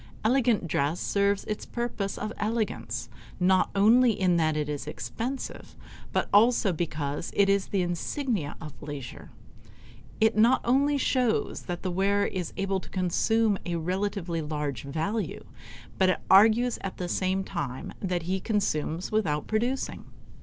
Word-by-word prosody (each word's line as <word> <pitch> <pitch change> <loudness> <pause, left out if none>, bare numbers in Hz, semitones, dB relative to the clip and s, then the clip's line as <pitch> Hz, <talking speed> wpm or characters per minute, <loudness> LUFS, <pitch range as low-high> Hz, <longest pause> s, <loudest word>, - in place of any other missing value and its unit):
Elegant 235 -6 +3
dress 150 +2 0
serves 200 0 +1
its 215 - -4
purpose 235 -5 -3
of 215 +1 -4
elegance 205 - -2 0.3
not 185 +1 +3
only 225 +3 +5
in 180 -2 +3
that 155 -2 +1
it 150 -1 -1
is 150 -1 -4
expensive, 225 - -5 0.4
but - - 0
also 220 -1 +5
because 155 -2 -3
it 200 - +4
is 200 -1 +2
the 195 -3 0
insignia 175 - -2
of 155 -3 -8
leisure. 145 -4 -7 0.9
It 220 0 +3
not 230 +4 +5
only 280 +4 +3
shows 250 -4 +1
that 175 -1 -4
the 185 - -1
wearer 200 +3 +2
is 180 -4 -3
able 195 -1 0
to - - -13
consume 205 +3 +1
a 175 - -3
relatively 180 0 -2
large 150 -5 -3
value, 160 +10 -2 0.6
but 190 -1 +5
it 185 - +1
argues 225 +5 +5
at 195 - -5
the 180 - -3
same 190 +2 0
time 130 -8 -5
that 180 -3 -2
he 185 +3 -1
consumes 180 -5 -1
without 160 -9 0
producing. 240 +5 -2
190 Hz, 145 wpm, -27 LUFS, 165-220 Hz, 0.9 s, only